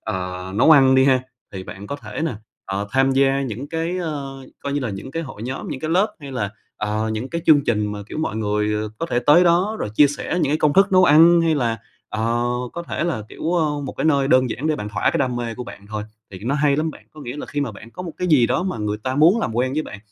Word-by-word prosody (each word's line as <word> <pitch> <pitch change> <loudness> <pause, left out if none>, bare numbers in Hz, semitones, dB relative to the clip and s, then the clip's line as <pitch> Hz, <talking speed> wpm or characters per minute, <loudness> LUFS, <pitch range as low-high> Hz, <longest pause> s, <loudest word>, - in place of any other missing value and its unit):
ờ, 90 0 -5
nấu 125 +10 +4
ăn 135 -3 +7
đi 130 - +5
ha. 130 -2 +3 0.3
Thì 95 -1 -6
bạn 100 +2 -9
có 140 - -4
thể 105 -3 -7
nè, 155 - -2 0.3
ờ, 100 +1 -3
tham 135 +3 +3
gia 135 0 +2
những 130 +2 -5
cái, 165 +3 -2
ờ, 140 -5 -5 0.2
coi 140 - -3
như 145 - 0
là 125 -5 -2
những 100 +7 -7
cái 165 +3 -3
hội 135 -7 -9
nhóm, 130 +3 -5
những 130 - -5
cái 155 - -3
lớp 190 +6 +2
hay 140 -2 -8
là, 100 -6 -2 0.3
ờ, 105 +1 -2
những 110 +4 -4
cái 170 +2 -4
chương 145 -3 +6
trình 105 -3 0
mà, 105 - -6
kiểu, - - -6
mọi 135 -8 -2
người 105 0 -1
có 165 - -2
thể 120 - +2
tới 170 +5 +7
đó 180 +6 +2
rồi - - -3
chia 145 - +7
sẻ 145 - -5
những - - +1
cái 155 - +1
công 150 -1 +3
thức 195 +2 +4
nấu 185 0 +6
ăn 165 +2 +7
hay 165 -1 +2
là, 120 -5 0 0.3
ờ, 115 +2 -1 0.3
có 170 - -5
thể 170 - -3
là, 155 -11 -2
kiểu, 165 - -3
ơ, 150 -4 0
một - - -5
cái - - -2
nơi 140 -3 +3
đơn 130 -2 +4
giản 145 - -3
để 155 -1 +1
bạn 105 - -5
thỏa 105 - +1
cái - - -1
đam 125 -2 0
mê 115 -1 -3
của 125 - -6
bạn 100 -3 -11
thôi, 105 0 -4 0.3
thì 95 - -8
nó 135 - 0
hay 145 -1 +2
lắm 160 +2 0
bạn. - - -15
Có 155 - -13
nghĩa 125 +1 -6
là - - -6
khi 145 - -3
mà 120 -6 -2
bạn 110 +3 -12
có 180 - -8
một 170 -3 -6
cái 180 - -2
gì 135 -8 +5
đó 130 +9 0
mà 185 -9 -3
người 105 0 -2
ta 130 0 -1
muốn 170 +10 +5
làm 115 - -2
quen 130 +2 +1
với 155 +2 0
bạn, 100 - -9
135 Hz, 285 wpm, -21 LUFS, 110-155 Hz, 0.3 s, ăn